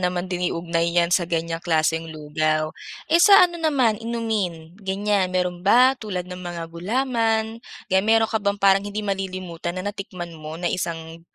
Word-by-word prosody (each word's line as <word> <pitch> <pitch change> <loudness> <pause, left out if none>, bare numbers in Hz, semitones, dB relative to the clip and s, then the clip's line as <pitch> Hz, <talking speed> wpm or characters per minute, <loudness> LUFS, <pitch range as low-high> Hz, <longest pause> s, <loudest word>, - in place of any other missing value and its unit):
naman 180 0 -1
din 180 -1 -1
iugnay 170 0 -1
'yan 170 0 +3
sa 175 -2 +2
ganiyang 165 0 -2
klaseng 160 -1 0
lugaw. 155 0 -1 0.3
Eh, 335 +2 +3
sa 395 0 +8
ano 345 -1 -3
naman, 255 -9 +2
inumin, 215 -8 -3
ganiyan, 195 0 0
mayro'n 180 -1 -1
ba 245 +8 +5
tulad 185 -5 -4
ng 180 0 -8
mga 175 -1 -5
gulaman, 225 +3 0 0.3
kaya 190 - +5
mayro'n 225 +2 +3
ka 220 - +1
bang 200 0 0
parang 195 -1 +4
hindi 205 +1 -5
malilimutan 185 -3 -4
na 200 +3 -3
natikman 185 -4 -7
mo 155 0 -8
na 175 - -8
isang, 165 -2 -4
185 Hz, 170 wpm, -23 LUFS, 170-215 Hz, 0.3 s, sa